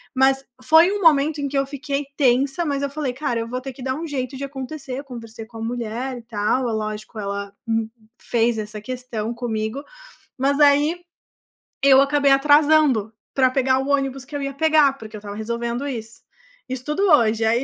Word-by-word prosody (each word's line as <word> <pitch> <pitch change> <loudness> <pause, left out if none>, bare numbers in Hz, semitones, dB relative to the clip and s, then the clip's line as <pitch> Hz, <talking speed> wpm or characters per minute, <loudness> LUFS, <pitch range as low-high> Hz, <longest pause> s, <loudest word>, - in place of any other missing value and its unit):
Mas 265 +1 +3 0.2
foi 325 +5 +6
um 410 0 -2
momento 305 -2 +4
em 280 - -1
que 280 0 -2
eu 275 - +2
fiquei 285 0 -3
tensa. 270 +4 +2
Mas 280 -2 -1
eu 280 - -1
falei: 280 -3 -3
“Cara, 250 -3 -2
eu 230 - -5
vou 250 +2 -4
ter 265 0 -7
que 255 0 -11
dar 260 0 -1
um 325 +3 -5
jeito 270 -2 -4
de 275 - -6
acontecer.” 275 0 -6
Eu 280 - -7
conversei 230 -4 -9
com 225 0 -13
a - - -7
mulher 240 +2 -3
e 235 - -10
tal. 230 +3 0
É - - -2
lógico, 215 0 -4
ela 200 0 -4
me 225 -1 -1 0.3
fez 235 -1 +1
essa 210 -1 -5
questão 240 -2 -4
comigo. 230 +2 -3 0.6
Mas 280 +2 +1
aí 295 +4 +4 0.8
eu 270 -1 +7
acabei 280 0 +3
atrasando 290 -5 +4 0.2
pra 260 -2 +4
pegar 260 0 +2
o 270 +1 -3
ônibus 270 -2 0
que 290 - -9
eu 285 - -2
ia 275 0 -3
pegar, 310 -1 +4
porque 220 -3 -10
eu - - -8
estava 205 0 -8
resolvendo 235 +4 -3
isso. 230 -4 -6 0.5
Isso 255 0 -5
tudo 300 +6 -1
hoje. 225 -6 +4
Aí 230 +3 +2
260 Hz, 200 wpm, -22 LUFS, 230-280 Hz, 0.8 s, eu